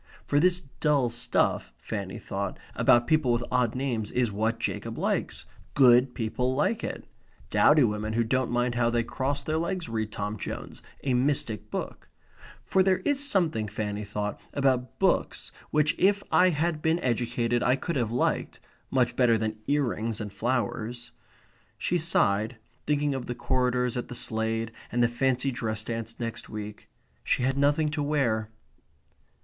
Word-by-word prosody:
For 145 - +2
this 180 +2 +3 0.2
dull 140 -6 +2
stuff 115 - +1
(Fanny - - -5
thought) - - -4 0.2
about 120 -2 +4
people 155 -6 +2
with 120 0 +1
odd 125 -2 +1
names 125 -5 -2
is 125 -3 0
what 110 +3 0
Jacob - - -3
likes. - - -1 0.3
Good 125 -1 +5
people 125 +3 -1
like 215 +11 0
it. - - -5 0.5
Dowdy 150 -1 +5
women 110 -1 -1
who 115 +1 +2
don't 130 +2 0
mind 120 0 +1
how 120 -1 +2
they 120 0 +1
cross 135 +4 -2
their 155 0 -1
legs 175 +1 -2
read 110 -1 -3
Tom 105 +1 -3
Jones - - -6 0.2
a 135 - +1
mystic 125 -5 0
book; - - -5 0.5
for 190 - +2
there 190 0 +3
is 285 -1 +2
something, 170 - +1
Fanny 105 0 -3
thought, 105 0 -4
about 130 -3 +1
books - - 0 0.2
which 150 0 +2
if 200 +1 +3
I 185 0 +6
had 160 -1 -1
been 160 +1 +2
educated 120 0 0
I 125 - +3
could 170 +4 -4
have 120 -5 0
liked 120 +2 -1 0.3
much 125 -3 +1
better 120 -3 +4
than 110 0 -3
ear 145 0 +2
rings 115 -3 -2
and 105 -2 -5
flowers, 120 +1 -2 0.7
she 175 - 0
sighed, 110 -8 +2 0.3
thinking 145 -1 +1
of 130 -2 -4
the 120 - -3
corridors 125 -1 0
at 125 - -3
the 125 - -7
Slade 115 -1 0 0.2
and 120 0 +2
the - - +5
fancy 130 +2 0
dress 110 -3 -3
dance 115 0 -5
next 115 -1 -5
week. 105 -1 -7 0.3
She 125 - +1
had 130 +1 +1
nothing 145 +2 +2
to 155 -1 -2
wear. 125 -7 0
125 Hz, 165 wpm, -27 LUFS, 115-145 Hz, 0.7 s, I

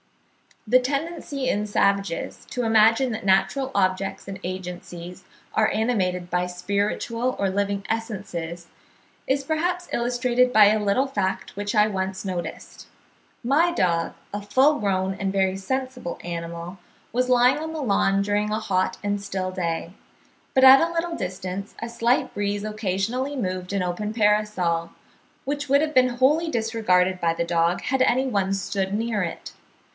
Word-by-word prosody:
The 255 +4 +6
tendency 280 0 -3
in 210 -2 0
savages 200 -3 0
to 250 - -2
imagine 225 +3 +4
that 220 -3 -5
natural 195 +8 +2
objects 190 0 0
and 195 -1 -6
agencies 180 0 -7 0.3
are 215 - +3
animated 185 -6 0
by 180 0 0
spiritual 205 +7 -1
or 195 - +1
living 200 +1 -1
essences, 185 -7 -4 0.6
is 275 +1 +1
perhaps 350 +4 -1
illustrated 245 +1 +1
by 215 -1 +8
a 215 +1 +3
little 205 +7 +2
fact 200 -7 -2
which 205 +2 -3
I 210 0 +5
once 190 -1 -3
noticed: 180 -2 -6 0.6
my 300 +8 +3
dog, 170 - 0 0.2
a 205 - -3
full 265 +8 +3
grown 190 -2 0
and 195 0 -2
very 190 -1 +1
sensible 255 -1 -4
animal, 170 +1 -6 0.3
was 250 +2 0
lying 250 +2 +5
on 320 +1 -5
the 315 - -4
lawn 200 -4 +2
during 205 +1 0
a 215 - 0
hot 185 -3 0
and 205 0 -1
still 190 -2 -3
day; 170 -1 -3 0.6
but 260 - +5
at 265 +1 +10
a 335 +1 +1
little 340 0 -2
distance 185 - -5
a 230 - -5
slight 235 +2 +1
breeze 205 0 -1
occasionally 215 +6 -2
moved 185 -5 -3
an 195 -2 0
open 210 +4 -3
parasol, 210 -6 +1 0.5
which 285 0 -3
would 280 +1 +5
have 310 0 -1
been 255 -2 +5
wholly 280 +7 +2
disregarded 220 -7 +1
by 165 -1 +1
the 170 - 0
dog, 170 +1 +1
had 265 -1 0
any 260 +1 +2
one 200 -5 0
stood 195 0 -2
near 220 0 -1
it. 170 -2 -5
205 Hz, 155 wpm, -24 LUFS, 185-250 Hz, 0.6 s, at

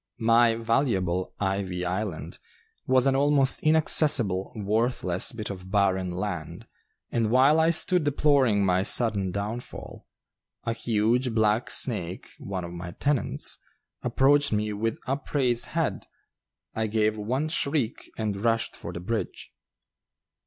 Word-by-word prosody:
My 115 0 +3
valuable 115 -7 0
"Ivy 95 -2 -2
Island" 95 -1 -4 0.5
was 130 0 +3
an 135 -1 +2
almost 140 -1 +4
inaccessible, 145 - +3
worthless 105 -3 0
bit 110 -3 -5
of 95 -1 -9
barren 95 -2 +1
land, 90 -3 -5 0.5
and 115 -2 0
while 135 +6 +4
I 160 +1 +3
stood 170 +1 +4
deploring 140 -8 +2
my 90 0 +2
sudden 100 -2 0
downfall, 105 +6 -6 0.6
a 115 - -1
huge 115 +2 0
black 110 +1 +1
snake 95 -7 -2
(one 95 -2 -5
of 85 - -7
my 85 0 -7
tenants) 145 +3 -1 0.4
approached 145 +2 +3
me 105 0 -1
with 110 +2 -2
upraised 130 -2 -1
head. - - -2 0.7
I 110 0 -1
gave 110 0 +1
one 125 +8 -2
shriek 140 -6 -2
and 105 -3 -2
rushed 115 -1 0
for - - -8
the - - -7
bridge. 110 +6 -5
110 Hz, 125 wpm, -26 LUFS, 95-130 Hz, 0.7 s, almost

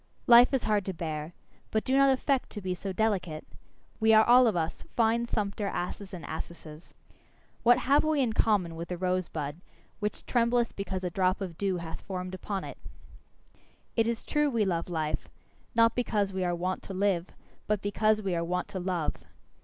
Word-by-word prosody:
Life 240 +1 +8
is 265 -3 0
hard 210 -2 +1
to 190 - -4
bear: 160 -1 -5 0.3
but 220 - 0
do 260 - +1
not 275 0 +6
affect 265 0 +1
to 210 - -5
be 185 -1 -2
so 195 +2 -5
delicate! 185 -6 -1 0.5
We 220 0 +5
are 220 - +7
all 250 +1 +7
of 220 - +1
us 165 -1 -2
fine 230 +1 +2
sumpter 205 -2 -2
asses 190 +1 -4
and 175 -3 -7
assesses. 160 -1 -8 0.7
What 240 +1 +6
have 280 +3 +3
we 310 -1 +1
in 245 -5 +1
common 195 -7 +1
with 170 +1 -6
the 180 - -4
rose 185 0 0
bud, 150 +1 -5 0.4
which 210 -1 -3
trembleth 235 -1 +1
because 190 -2 -4
a 180 - -2
drop 185 +1 +1
of 185 -4 -5
dew 190 0 -1
hath 170 -1 -7
formed 185 -1 -5
upon 190 +1 -4
it? - - -8 1.2
It 225 -1 +2
is 230 -1 -2
true 295 -1 +1
we 230 -5 +1
love 170 -2 -1
life; 155 -3 -2 0.5
not 230 0 +5
because 205 -5 0
we 190 -1 -1
are 175 -1 0
wont 185 +2 -2
to 195 - -7
live, 190 -2 +1 0.4
but 210 -1 +1
because 215 +1 +1
we 190 -2 -1
are 170 -1 0
wont 180 +2 -2
to 190 - -4
love. 175 -3 -1
195 Hz, 195 wpm, -29 LUFS, 175-225 Hz, 1.2 s, Life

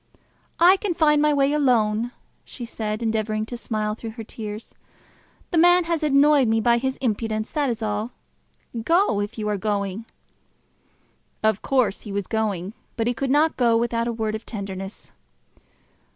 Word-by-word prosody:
"I 360 +3 +7
can 380 -3 -2
find 300 -3 +4
my 300 0 +4
way 280 0 +2
alone," 240 -5 +2 0.3
she 245 - -8
said, 215 -1 -4
endeavouring 215 -1 -1
to 240 - -6
smile 215 -3 -2
through 225 +1 -8
her 225 - -5
tears. 215 0 -8 0.8
"The 340 - +3
man 350 +1 +6
has 335 -1 -1
annoyed 290 -2 +4
me 225 0 +2
by 235 +2 +3
his 265 +1 -2
impudence, 220 -3 -2
that 290 -3 0
is 230 -1 -3
all. 210 +1 -2 0.7
Go, 335 - +3
if 205 +3 -5
you 215 -1 -3
are 210 -1 0
going." 205 +1 -2 1.4
Of 220 -2 +2
course 250 -7 +1
he 210 - -8
was 200 -1 -2
going; 205 -3 -2 0.2
but 225 - 0
he 245 - +1
could 265 +3 -3
not 300 +4 +3
go 235 -3 +4
without 230 0 0
a - - 0
word 220 -2 -2
of 220 +1 -5
tenderness. 195 -2 -7
230 Hz, 165 wpm, -23 LUFS, 215-275 Hz, 1.4 s, I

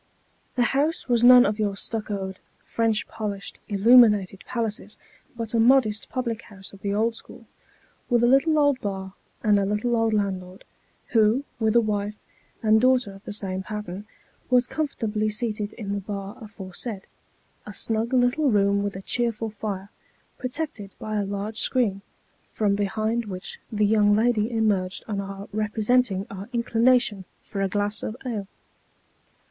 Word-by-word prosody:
The 245 - +3
house 300 +4 0
was 240 -2 +2
none 250 0 +9
of 210 +2 -1
your 205 -2 0
stuccoed, 200 -3 -4 0.3
French 225 -2 0
polished, 205 -2 -5
illuminated 210 -2 +5
palaces, 225 -3 -3 0.4
but 230 -1 -4
a 230 - +2
modest 225 -3 +3
public 235 -3 -3
house 195 -2 -13
of 195 - -14
the 200 - -2
old 220 +3 +1
school, - - -12 0.6
with 240 -1 +3
a - - +5
little 275 +5 +4
old 285 -3 +3
bar, 190 -2 -4 0.3
and 210 -2 +4
a - - +1
little 210 +4 0
old 225 -1 +2
landlord, 190 -2 -3 0.5
who, 225 +3 +3 0.2
with 220 -1 +1
a 235 - +7
wife 210 -1 -2 0.5
and 220 0 +5
daughter 255 -5 +3
of 195 +1 -14
the - - -5
same 190 -2 -3
pattern, 210 -1 -6 0.4
was 250 -1 +4
comfortably 225 -8 -2
seated 210 -1 -3
in 200 -3 -5
the 200 - -1
bar 200 0 -6
aforesaid 200 0 -6 0.6
a - - -6
snug 225 +3 -1
little 255 +3 +3
room 200 -2 +3
with 200 -1 -3
a 190 - -7
cheerful 230 -1 -1
fire, 200 -1 -5 0.5
protected 255 -6 -4
by 215 0 -4
a 205 - 0
large 205 +2 -3
screen: 215 -7 +1 0.5
from 210 -2 +1
behind 220 +3 -1
which 185 -3 -7
the 210 -1 +2
young 210 0 +4
lady 225 0 +2
emerged 205 -5 0
on 205 -2 -2
our 195 0 -7
represent 220 +4 +2
ing 190 0 -3
our 195 +2 -8
inclination 235 -3 +2 0.2
for 200 - -5
a 195 - +1
glass 205 +1 -1
of 220 - -5
ale. 215 -6 -3
215 Hz, 160 wpm, -25 LUFS, 200-235 Hz, 0.6 s, none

